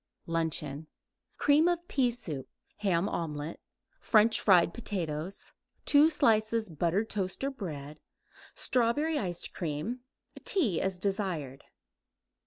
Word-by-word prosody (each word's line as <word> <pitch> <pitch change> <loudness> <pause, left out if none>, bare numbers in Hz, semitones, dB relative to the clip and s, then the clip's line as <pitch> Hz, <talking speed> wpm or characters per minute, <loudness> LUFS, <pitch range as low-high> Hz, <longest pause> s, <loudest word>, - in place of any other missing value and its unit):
LUNCHEON 160 -3 -2 0.5
Cream 295 +3 +4
of 345 0 0
pea 260 -3 +2
soup; 160 - -4 0.3
ham 190 -3 +1
omelette; 155 -3 -4 0.4
French 220 0 +4
fried 175 -4 +5
potatoes; 180 -5 -4 0.3
2 295 +2 +6
slices 225 - +2
buttered 170 +7 0
toast 190 +2 -2
or 275 - 0
bread; 155 - -7 0.6
strawberry 290 +6 +1
ice 175 -7 -1
cream; 170 +9 -4 0.4
tea 350 - +1
as 190 -1 -1
desired. 180 -9 -3
195 Hz, 105 wpm, -30 LUFS, 165-240 Hz, 0.6 s, 2